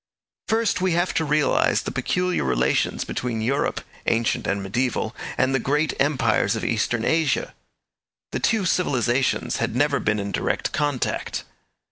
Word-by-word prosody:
First, 225 -3 +1
we 185 -2 +2
have 175 +2 +1
to 160 - +1
realize 150 0 +2
the - - -4
peculiar 180 0 0
relations 65 -2 +1
between 120 -3 -3
Europe, 125 +6 0 0.3
ancient 115 0 +1
and 100 0 -1
mediaeval, 120 +2 -1 0.2
and 130 +1 +2
the 135 - +2
great 150 +5 +1
empires 140 -1 +2
of - - -3
Eastern - - 0
Asia. 160 -3 +1 0.8
The - - -2
two 220 -4 +1
civilizations 130 -8 +1
had - - -2
never - - +2
been 110 0 +1
in 100 0 -3
direct - - -1
contact. 145 -4 -1
135 Hz, 145 wpm, -23 LUFS, 115-165 Hz, 0.8 s, we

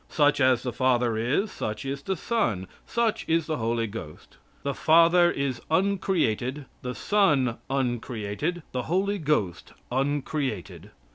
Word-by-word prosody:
Such 145 -1 +3
as 130 -2 +4
the 125 -2 -3
Father 125 -2 +2
is, 130 - 0
such 105 +3 -4
is 135 +1 -3
the 190 +6 -2
Son, 155 - -1 0.2
such 235 -2 0
is 165 -1 +2
the 155 -2 -2
Holy 115 0 0
Ghost. 100 -8 -9 0.3
The 140 - -1
Father 170 +3 +5
is 140 -6 -2
uncreated, 160 - 0 0.2
the 125 -1 -4
Son 145 - +2
uncreated, 125 +4 -2
the 125 - -1
Holy 195 +3 +1
Ghost 145 - -1 0.2
uncreated. 130 - -2
135 Hz, 135 wpm, -26 LUFS, 115-165 Hz, 0.3 s, Father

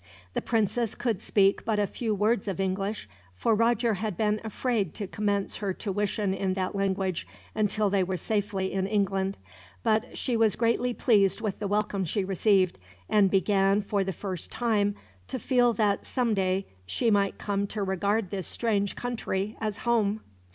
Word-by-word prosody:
The - - -1
princess 225 0 0
could 235 -5 -1
speak 195 -1 +3
but 220 -2 0
a 205 - +3
few 220 +2 -2
words 210 +1 +1
of 195 -2 -3
English, 195 - -2 0.3
for 225 - +2
Roger 230 +1 +2
had 205 -2 -3
been 210 -1 +1
afraid 220 - -1
to 205 - -3
commence 200 0 -1
her 195 -3 -2
tuition 205 -1 -1
in 190 -1 -1
that 185 -1 -2
language 190 -2 -1 0.3
until 215 0 +1
they 195 -2 +3
were 185 0 -2
safely 200 -2 -1
in 190 0 0
England: 195 -2 0 0.5
but 220 +2 +1
she 245 - 0
was 225 -3 +3
greatly 235 +1 +1
pleased 200 -6 +3
with 210 -4 -3
the 205 - -2
welcome 205 -1 0
she 190 +4 -1
received; 190 - +2 0.3
and 205 -2 +5
began, 195 +1 +3
for 200 0 0
the 190 - -2
first 185 0 -5
time, 210 -4 +1 0.3
to - - -3
feel 245 -2 +3
that 205 -2 +1
someday 195 -6 0 0.2
she 230 - +1
might 200 -1 +2
come 200 -1 -1
to 210 0 -3
regard 195 +1 0
this 190 -3 -3
strange 205 -4 0
country 220 -4 -3
as 215 -1 -2
home. 220 -3 +2
205 Hz, 170 wpm, -28 LUFS, 195-220 Hz, 0.5 s, and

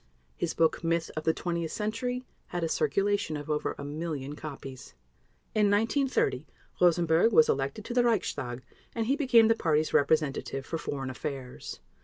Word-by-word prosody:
His 165 - -2
book, 165 +1 +2
Myth 165 0 0
of 155 - -4
the 160 - +5
Twentieth 170 -1 -3
Century, 245 +4 -2 0.2
had 175 -1 -3
a - - +1
circulation 195 -1 0
of 145 +1 -5
over 150 - -1
a - - -6
million 145 -1 -4
copies. 135 -4 -9 0.6
In 210 -2 +3
1930 225 - +1 0.3
Rosenberg 170 +3 +4
was 155 -7 +6
elected 140 +10 -1
to 240 - -4
the 245 0 +4
Reichstag 145 - -1 0.3
and 225 -1 0
he 265 +5 +2
became 250 -6 +5
the 225 - +5
Party's 155 -7 +1
representative 140 -2 +1
for 165 - -3
Foreign 135 -3 -4
Affairs. 130 -1 -6
165 Hz, 160 wpm, -29 LUFS, 145-215 Hz, 0.6 s, was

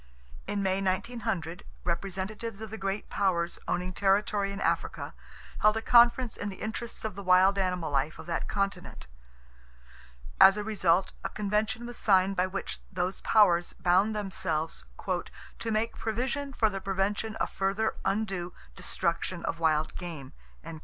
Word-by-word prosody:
In 200 -1 -1
May, 190 0 +1
1900, 195 -3 -2 0.2
representatives 195 +5 -3
of 220 -1 -7
the 220 - -5
great 195 +1 -2
powers 175 -3 0
owning 180 +1 -1
territory 200 +1 +2
in 200 - -5
Africa - - -1 0.5
held 215 +1 +4
a - - -1
conference 240 0 +5
in 205 - -3
the 195 - -7
interests 220 +2 -5
of 215 - -2
the 200 - -7
wild 190 +1 +5
animal 180 -4 -1
life 140 +2 0
of 160 - -9
that 165 -1 -2
continent. 195 - -3 1.3
As 195 +1 +9
a 210 - -2
result 190 -4 +2
a - - -1
Convention 210 +3 -1
was 240 0 -7
signed 195 -1 +3
by 185 0 +2
which 195 +1 -5
those 185 0 -2
powers 175 -6 +4
bound 190 +5 +2
themselves 185 - -2 0.7
"to 230 - -3
make 220 +2 0
provision 255 +5 -2
for 230 -4 +2
the 195 -2 -3
prevention 195 +3 -1
of - - -2
further 195 +3 0
undue 195 -3 -1 0.2
destruction - - -1
of 165 - -2
wild 155 -1 +2
game." 165 -7 -7
195 Hz, 150 wpm, -29 LUFS, 180-215 Hz, 1.3 s, As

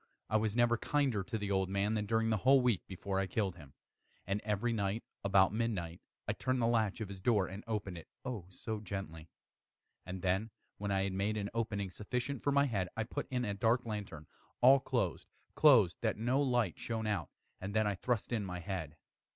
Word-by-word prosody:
I 110 - +5
was 110 -1 0
never 120 0 +4
kinder 140 -8 +1
to 110 +3 -3
the 100 -1 -3
old 95 -1 +1
man 100 +2 +1
than 105 -2 -1
during 115 +1 +2
the 110 - +3
whole 135 +6 +6
week 120 -7 +2
before 95 +1 -3
I 95 - 0
killed 95 -1 -1
him. 75 -5 -14 0.5
And 100 +2 -1
every 105 +3 0
night, 105 0 -1 0.2
about 100 -1 +4
midnight, 100 -7 -2 0.3
I - - +1
turned 130 0 -1
the 115 - +2
latch 115 -3 +1
of 110 - -2
his 95 -1 -8
door 105 -2 +3
and 95 +3 -7
opened 100 -5 -3
it 80 - -14 0.2
oh 110 -9 -4
so 110 +3 -5
gently! 90 -6 -6 0.7
And 90 0 -6
then, 95 +4 +1 0.3
when 100 0 -2
I 95 -1 +2
had 95 -1 -1
made 100 +3 0
an 100 -1 -3
opening 105 -4 -2
sufficient 125 +6 -3
for 140 - +1
my 140 0 +4
head, 100 -8 -1
I 110 - +1
put 110 - -4
in 125 -1 -1
a 100 - -1
dark 115 +5 +2
lantern, 100 -8 -5 0.3
all 135 +3 +8
closed, 120 -9 -1 0.3
closed, 120 - +6
that 110 -2 0
no 125 +5 +2
light 120 -9 +1
shone 115 -1 -3
out, 100 -7 -1 0.3
and 100 +2 -5
then 110 0 +3
I 105 - +1
thrust 120 +4 -1
in 110 -3 0
my 90 -2 -4
head. 85 -5 -5
105 Hz, 210 wpm, -34 LUFS, 95-115 Hz, 0.7 s, all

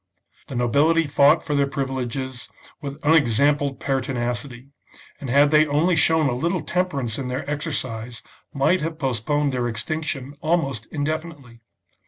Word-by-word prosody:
The 135 - -7
nobility 145 +8 +3
fought 145 +2 +4
for 150 - -3
their 140 -1 +2
privileges 130 -2 -4 0.3
with 140 0 -6
unex 145 -7 +3
ampled 145 -1 +2
pertinacity, 130 -1 -3 0.5
and 135 - -6
had 145 +3 +4
they 155 0 +5
only 155 +5 +2
shown 160 -1 +4
a 130 - 0
little 170 +6 -1
temperance 140 -12 -2
in 130 - -3
their 125 +3 -4
exercise, 130 -6 -4 0.3
might 145 +7 +2
have 160 +1 -3
postponed 140 +1 0
their 125 -1 -1
extinction 140 +3 -4
almost 140 -9 -1
indefinitely. 145 -5 -5
140 Hz, 140 wpm, -23 LUFS, 125-155 Hz, 0.5 s, they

